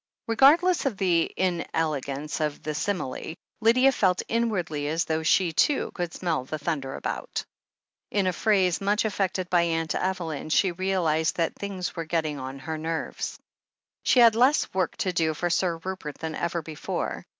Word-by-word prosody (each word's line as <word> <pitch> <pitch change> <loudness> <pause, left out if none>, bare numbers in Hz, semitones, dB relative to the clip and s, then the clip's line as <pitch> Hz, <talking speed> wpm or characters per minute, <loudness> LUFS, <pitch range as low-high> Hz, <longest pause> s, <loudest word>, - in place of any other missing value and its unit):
Regardless 295 +9 +5
of 225 -7 -2
the 175 -4 +2
inelegance 155 -5 -1
of 150 -2 -2
the 155 - -2
simile, 160 -3 -3 0.3
Lydia 255 +4 +5
felt 185 -7 +1
inwardly 180 -11 -1
as 160 +2 0
though 160 0 -1
she, 165 +1 +2
too, 280 - +2
could 175 -2 -3
smell 165 -7 -1
the 155 +4 -5
thunder 145 -3 -3
about. - - -4 0.6
In 200 -2 +1
a 185 - +1
phrase 190 -2 +2
much 205 +3 +1
affected 190 -3 -1
by 175 -1 +5
Aunt 165 -1 0
Evel3m, 170 -5 -2
she 190 +3 +3
realized 170 -3 0
that 165 -1 0
"things 195 -3 -5
were 165 - -4
getting 155 -3 -1
on 130 +1 -6
her 155 +4 -5
nerves." 160 +1 -3 0.6
She - - +2
had 230 -2 +8
less 255 +6 +3
work 185 0 -1
to 185 - -1
do 160 -2 +1
for 175 +3 -1
Sir 175 -1 +1
Rupert 165 -4 -6
than 160 -1 -4
ever 170 +1 -2
before. 155 -1 -4
170 Hz, 165 wpm, -26 LUFS, 160-195 Hz, 0.6 s, had